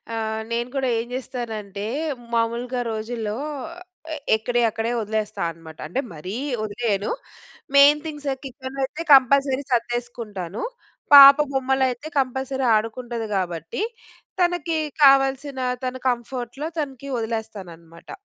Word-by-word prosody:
అహ్, 220 0 -2
నేను 235 +1 -1
గూడా 265 -2 +1
ఏం 235 - -4
చేస్తానంటే 220 -6 -5 0.5
మామూలుగా 235 +2 -1
రోజుల్లో 220 -1 -3 1.0
ఎక్కడియక్కడే 230 0 0
వదిలేస్తా 215 0 -3
అనమాట. 160 -1 -13
అంటే 180 +12 -2
మరీ 180 +7 -6 0.3
వదిలేయను 210 -1 -1 0.6
మెయిన్ 290 +2 +7
థింగ్స్ 295 -2 -6 0.2
కిచన్‌లో 265 0 -7
అయితే 315 +5 -6
కంపల్సరీ 275 +1 +5
సర్దేసుకుంటాను. 235 -5 -3 0.5
పాప 280 0 +12
బొమ్మలయితే, 265 0 0
కంపల్సరీ 265 0 -1
ఆడుకుంటది 230 +1 -2
గాబట్టి, 175 - -3 0.6
తనకి 350 -2 +1 0.3
కావాల్సిన 270 0 +4 0.3
తన 255 - -2
కంఫర్ట్‌లో 245 +3 -4
తనకి 275 -2 -5
వదిలేస్తాననమాట. 190 -8 -6
240 Hz, 100 wpm, -23 LUFS, 220-270 Hz, 1.0 s, పాప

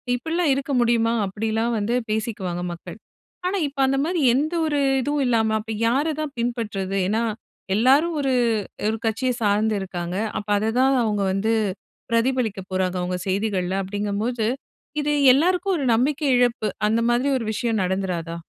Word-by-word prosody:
இப்பிடிலாம் 320 +5 0
இருக்க 275 +1 -3
முடியுமா? 230 -1 +2
அப்பிடிலாம் 220 +4 -1
வந்து, 215 +4 0
பேசிக்குவாங்க 210 -5 -2
மக்கள். 175 +3 -10 0.5
ஆனா, 390 +2 0
இப்ப 280 0 -10
அந்தமாரி 280 +7 0
எந்த 300 +6 0
ஒரு 295 -2 0 0.2
இதுவும் 290 +1 0
இல்லாம 220 -2 +2
அப்ப 220 +1 -7 0.2
யார 265 +6 +2 0.2
தான் 300 -3 -4
பின்பற்றது? 210 -5 -2
ஏன்னா, 220 +4 +1 0.5
எல்லாரும் 275 +9 +4
ஒரு, 270 -2 +1 0.5
ஒரு 220 +1 0
கட்சிய 240 +4 0
சார்ந்து 215 +1 +2
இருக்காங்க. 180 -1 -4 0.2
அப்ப 205 - -10
அததான் 245 +6 +2
அவுங்க 210 -2 0
வந்து 205 +4 0 0.6
பிரதிபலிக்க 230 -3 +1
போறாங்க. 185 -1 0
அவுங்க 180 0 -2
செய்திகள்ல 190 -1 0
அப்படிங்ககம்போது, 205 +4 -2 0.5
இது 295 0 0 0.2
எல்லாருக்கும் 360 +6 +2
ஒரு 280 - -2
நம்பிக்கை 285 +5 0
இழப்பு. 245 -3 +1 0.2
அந்த 225 +1 +2
மாதிரி 245 +4 +2
ஒரு 235 - -4
விஷயம் 225 -2 0
நடந்துறாதா? 180 -3 -2
225 Hz, 145 wpm, -23 LUFS, 205-265 Hz, 0.6 s, எல்லாரும்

